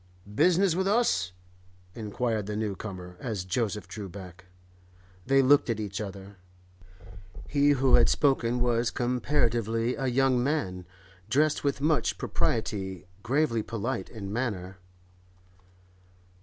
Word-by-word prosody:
'Business 175 - +3
with 190 +3 0
us?' 200 - +2 0.6
inquired 110 -1 -2
the 105 - -3
new 105 -2 -2
comer, 90 -3 -8
as 105 -7 -4
Joseph 105 0 -2
drew 100 +1 -7
back. 90 0 -11 0.8
They 135 +1 +5
looked 140 0 +5
at 115 -2 0
each 105 -1 -4
other. 100 -1 -8 1.1
He 145 0 +3
who 130 0 +2
had - - +6
spoken 125 -4 +2
was 120 -1 +2
comparatively 120 -2 0
a 135 -1 -2
young 130 0 +2
man, 95 - -2 0.4
dressed 150 +6 +2
with 140 -1 0
much 155 +1 +1
propriety, 95 -3 -2 0.2
gravely 125 -1 +1
polite 115 +4 -3
in 100 -3 -7
manner. 95 -6 -3
115 Hz, 120 wpm, -28 LUFS, 100-135 Hz, 1.1 s, had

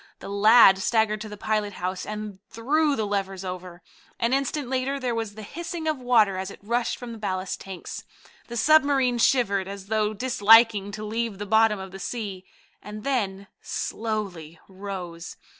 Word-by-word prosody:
The - - -9
lad 200 -1 +7
staggered 215 +1 +1
to 215 - -6
the 210 - -8
pilot 210 -1 -1
house 185 +1 -4
and 210 -2 -6
threw 290 +6 +1
the 220 - -1
levers 195 -2 -3
over. 180 -1 -7 0.4
An 235 +2 +1
instant 275 0 -1
later 260 +2 -1
there 250 -2 -1
was 225 -3 -4
the 215 - -8
hissing 335 - -6
of 310 -3 0
water 225 -6 +3
as 190 +1 -4
it - - -10
rushed 235 +3 -1
from 245 -1 -8
the 225 - -8
ballast 185 -2 -3
tanks. 190 -3 -8 0.4
The 235 - -6
submarine 275 -3 +4
shivered, 200 -7 +2
as 200 0 -8
though 215 -1 0
disliking 225 -3 +5
to 215 +1 -6
leave 225 -1 -2
the 205 - -5
bottom 220 +1 +4
of 190 -1 -8
the 195 - -9
sea, 200 -5 -5 0.4
and 210 0 -9
then 200 -8 -1 0.2
slowly 195 -8 -4
rose. 185 -3 -7
215 Hz, 175 wpm, -25 LUFS, 195-240 Hz, 0.4 s, lad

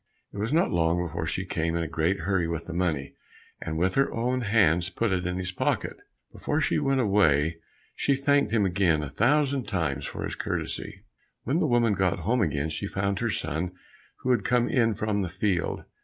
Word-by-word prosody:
It 100 - -6
was 110 +4 -1
not 165 +3 +2
long 85 0 +2
before 85 - -4
she - - -2
came 80 +1 -1
in 85 - 0
a - - -3
great 80 +4 0
hurry 90 -1 0
with 85 0 -4
the 90 - -6
money, 80 -6 -1 0.5
and 80 -1 -3
with 90 +3 +1
her 135 0 +2
own 125 +2 -1
hands 95 -6 +3
put 115 +3 -1
it 90 -1 0
in 90 0 -2
his 90 -1 -3
pocket. - - -2 0.3
Before - - -1
she - - +1
went 135 -1 +1
away, 85 - +3 0.3
she 140 - +1
thanked 140 -2 +2
him 110 -3 +3
again 90 -5 +2
a 70 - -6
thousand 135 - +2
times 75 -9 -1
for - - -6
his - - -3
courtesy. - - -4 0.4
When 140 +8 0
the 160 - +2
woman 120 -4 +3
got 95 -2 +1
home 115 +8 +1
again, 75 -4 0
she 100 +5 -3
found 100 0 -1
her - - 0
son 85 +5 -2 0.5
who 130 - +1
had 120 -5 +2
come 120 0 +2
in 115 -4 +2
from 105 -1 -1
the 90 - -2
field. 90 -2 -1
95 Hz, 205 wpm, -27 LUFS, 85-115 Hz, 0.5 s, hands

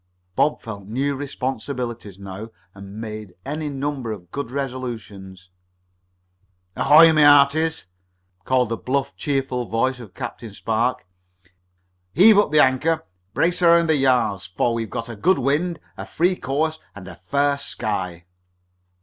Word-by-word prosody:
Bob 150 - +2
felt 100 -4 -8
new 135 +6 -1
responsibilities 125 -6 -5
now, 100 +3 -8 0.2
and 100 +2 -10
made 110 -4 -7
any 150 +2 -3
number 135 -4 -3
of 90 -5 -9
good 140 -4 -4
resolutions. 110 -9 -6 1.2
"Ahoy, 160 +2 +7
my 155 - +4
hearties!" 145 +2 +4 0.6
called 125 0 +1
the 115 - -2
bluff, 135 +4 -2
cheerful 135 -4 -2
voice 120 +5 -1
of 110 -6 -12
Captain 120 -4 -7
Spark. 115 +2 -1 1.1
"Heave 205 +2 +7
up 205 - +2
the 150 -1 +6
anchor, 150 +5 +1 0.3
brace 175 +2 +1
around 170 -1 +5
the - - +3
yards, 120 -9 +1
for 110 +6 0
we've 115 -2 -3
got 115 +5 -5
a 120 - -7
good 180 - +2
wind, 150 +6 0 0.2
a - - -7
free 180 +3 +1
course 155 +2 -2 0.2
and 100 -2 -10
a 95 - -8
fair 140 +10 0
sky!" 90 -10 -4
130 Hz, 140 wpm, -22 LUFS, 110-145 Hz, 1.2 s, Ahoy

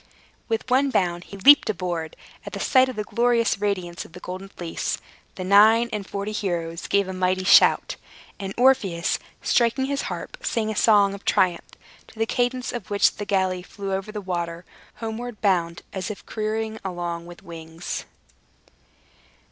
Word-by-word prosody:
With 225 +1 -1
one 265 +2 +3
bound, 175 -7 0
he 200 - -10
leaped 275 +4 +7
aboard. 175 -5 -3 0.3
At - - -6
sight 260 -1 +4
of 255 - -6
the 210 - -2
glorious 235 -1 +1
radiance 185 -4 -2
of - - -16
the - - -9
Golden 185 +2 -7
Fleece, 175 -4 -3 0.4
the 185 - -5
nine 215 +5 +6
and 205 -2 -4
forty 200 +1 -3
heroes 170 -5 -3
gave 200 -1 +2
a 190 - -4
mighty 185 0 0
shout, 185 - +5 0.4
and 195 -1 -4
Orpheus, 235 -10 +2 0.2
striking 240 +2 +2
his 275 0 -1
harp, - - -6
sang 225 - -1
a - - -5
song 205 -2 +4
of 200 - -9
triumph, 180 -2 +1 0.4
to - - -18
the 225 - +1
cadence 250 +2 -1
of 240 -5 -6
which 205 -1 +3
the 205 - -4
galley 190 -2 0
flew 195 +2 -6
over 195 +2 -3
the 210 -1 -5
water, 175 -2 -4 0.3
homeward 225 0 -6
bound, 175 -4 0
as 185 -1 -4
if 210 - -8
careering 220 0 -3
along 175 -2 -4
with 175 0 -12
wings! 165 0 -7
200 Hz, 165 wpm, -24 LUFS, 180-225 Hz, 0.4 s, leaped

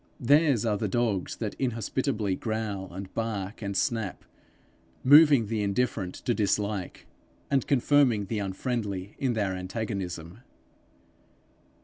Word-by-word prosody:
Theirs 140 -2 +4
are 105 -2 +1
the 105 - -1
dogs 105 -2 -1
that 110 -3 -4
inhospitably 115 -3 -1
growl 110 -4 -3
and 95 +1 -8
bark 110 -2 -3
and 100 -2 -3
snap, 110 -5 -1 0.8
moving 145 -3 +7
the 110 0 -2
indifferent 100 -2 -1
to 120 - +2
dislike, 105 -3 -1 0.5
and 135 -2 +2
confirming 135 -5 +3
the 110 +2 -3
unfriendly 100 -1 -3
in 130 -3 +1
their 100 -4 -1
antagonism. 90 -2 -5
110 Hz, 115 wpm, -27 LUFS, 100-120 Hz, 0.8 s, moving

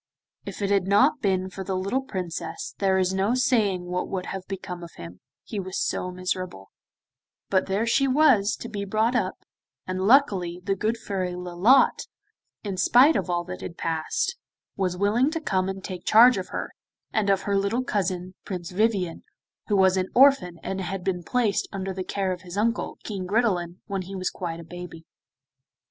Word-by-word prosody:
If - - -5
it 200 - 0
had 195 -2 +2
not 260 +9 +4
been 190 -3 0
for 190 - -6
the 190 0 -3
little 200 +8 -1
Princess 185 -10 -5
there 190 -1 +2
is 185 0 +1
no 195 +5 +1
saying 215 -8 +2
what 180 +1 -2
would 185 -2 -3
have 195 - -5
become 190 -2 -6
of 170 - -8
him, 85 +1 -10 0.2
he 210 - -5
was 185 -1 -4
so 180 - -1
miserable, 185 - -4 0.8
but 190 -1 +2
there 200 +4 0
she 270 +4 +2
was 255 -7 +4
to - - -5
be 205 -3 -4
brought 220 +5 +1
up, - - 0 0.5
and 185 +1 -2
luckily 195 -10 +3
the 195 - +1
good 220 +4 -1
Fairy 185 -5 -3
Lolotte, 180 +9 +3 0.6
in 200 -3 -4
spite 255 - +6
of - - -1
all 175 -1 0
that 180 +1 -7
had 170 - -7
passed, 165 - -1 0.4
was 185 -2 -1
willing 215 +8 +2
to 325 +1 -3
come 190 -10 0
and 190 0 -6
take 180 -2 -6
charge 235 0 +7
of 185 - -5
her, - - -5 0.4
and 215 -2 +1
of 195 -1 +2
her 200 - 0
little 200 +6 +1
cousin 185 -5 -2
Prince 180 -3 -5
Vivien, 190 -4 0 0.4
who 210 - +1
was 190 0 +4
an 185 0 -1
orphan 250 -10 +5
and 190 0 -3
had 190 0 -4
been 180 -2 -1
placed 230 +1 0
under 195 -1 -4
the 185 0 -4
care 190 0 -2
of 180 -1 -4
his 180 +1 -8
uncle, 230 +3 0
King 195 -4 -5
Gridelin, 185 -5 0
when 195 -2 -3
he 190 +2 -8
was 185 -1 -2
quite 170 -2 -5
a - - -8
baby. 170 -1 -9
190 Hz, 190 wpm, -25 LUFS, 180-215 Hz, 0.8 s, charge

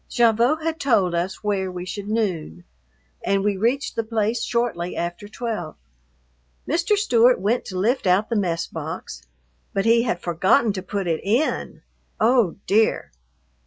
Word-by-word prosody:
Gavotte 240 +6 +3
had 325 0 -2
told 215 - +2
us 175 +4 -2
where 195 -3 -1
we 180 0 -6
should 200 +2 -6
noon, 175 - -2 0.6
and 195 0 +1
we 205 -1 +1
reached 240 +9 0
the 230 - 0
place 220 +1 -1
shortly 235 -9 -1
after 175 +4 -4
twelve. 215 -7 -5 0.9
Mr. 340 +6 +1
Stewart 245 - +4
went 215 +6 0
to 185 - -6
lift 230 +4 +1
out 190 +4 +3
the 235 - -2
mess 170 -5 0
box, 65 - -7 0.5
but 195 - +1
he 230 +1 +5
had 220 -7 -1
forgotten 185 +6 +2
to 190 - -4
put 200 0 -3
it 165 -2 -1
in! 235 +10 -1 0.4
Oh, 230 -5 +3
dear! 215 +2 +2
210 Hz, 155 wpm, -23 LUFS, 185-235 Hz, 0.9 s, he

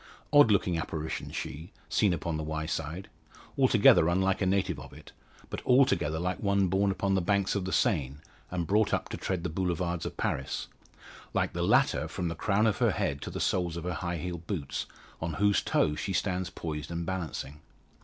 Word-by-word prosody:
Odd 145 -5 +8
looking 90 -4 +2
apparition 80 -1 -4
she, 80 +8 -6 0.2
seen 105 -3 +2
upon 85 -1 -2
the 80 - -2
Wyeside; 80 +3 -3 0.5
altogether 80 - +6
unlike 95 +2 +1
a 95 - +2
native 95 0 +1
of - - -11
it, - - -13 0.4
but - - -5
altogether 100 - +3
like 90 +2 -2
one 100 -2 +2
born 100 +2 +2
upon 95 0 0
the 95 - +2
banks 100 +2 +1
of 100 -3 -1
the 95 - -3
Seine, 75 - +1 0.3
and 90 -2 -2
brought 105 +4 +3
up - - -5
to - - -4
tread 90 -3 -2
the 90 - -1
Boulevards 85 -1 -1
of - - -8
Paris 65 - -2 0.7
like - - +1
the - - -2
latter - - +3
from 90 - -3
the 85 - -4
crown 100 +6 +1
of 110 - +2
her - - +3
head 70 0 -1
to - - -5
the - - -5
soles 85 -2 0
of 85 - -5
her 90 0 -2
high 85 +2 -3
heeled 85 0 -5
boots, 75 -10 -3 0.3
on 80 0 -2
whose 100 +2 +3
toes 75 0 +1
she 95 - -2
stands 90 0 -1
poised 75 -2 -5
and 85 0 -3
balancing. 80 -5 -4
90 Hz, 195 wpm, -29 LUFS, 80-95 Hz, 0.7 s, Odd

